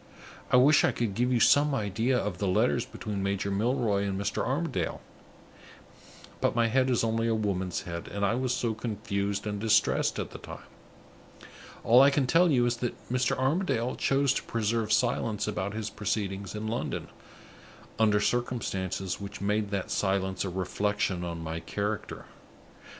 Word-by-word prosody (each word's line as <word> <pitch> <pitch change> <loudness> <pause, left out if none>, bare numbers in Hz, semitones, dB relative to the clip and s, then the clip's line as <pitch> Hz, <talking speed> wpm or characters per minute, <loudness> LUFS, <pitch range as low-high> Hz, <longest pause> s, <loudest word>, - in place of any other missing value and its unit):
I - - +5
wish 140 +4 +6
I - - +4
could 115 -4 -2
give 125 +5 0
you 125 - +3
some 145 +4 +4
idea 110 +4 0
of 100 -5 -3
the 100 - 0
letters 90 - +2
between 105 -2 -5
Major 100 0 -1
Milroy 105 -1 +1
and 100 -1 -2
Mr. 100 +1 -1
Armadale; - - -2 1.4
but - - +1
my 115 -1 +3
head 130 +2 +2
is 125 -3 +2
only 115 0 0
a 115 - +2
woman's 95 -4 -2
head, 85 -1 -6
and 100 0 -2
I 100 - +2
was 130 +1 -1
so 120 -3 0
confused 100 -3 -3
and 105 -1 -3
distressed 110 0 +2
at - - -4
the - - -9
time! - - -10 1.2
All 120 +3 +7
I 140 - +7
can 140 -1 +1
tell 170 +7 +4
you 125 -5 +3
is 120 0 0
that 120 0 -3 0.2
Mr. 125 -2 +1
Armadale 130 -3 0
chose 135 -1 +2
to - - -2
preserve 115 -1 -1
silence 115 -4 +1
about 100 -1 -3
his 110 -1 -4
proceedings 100 -1 -3
in 105 +1 -4
London, 115 +2 -3 0.9
under 105 -2 +4
circumstances 100 -6 -2
which 100 0 -7
made 105 +1 0
that 100 -2 -3
silence 95 -1 0
a 95 - -3
reflection 95 0 -1
on 85 -1 -5
my 80 +1 -4
character. 105 +4 -4
105 Hz, 165 wpm, -28 LUFS, 100-120 Hz, 1.4 s, All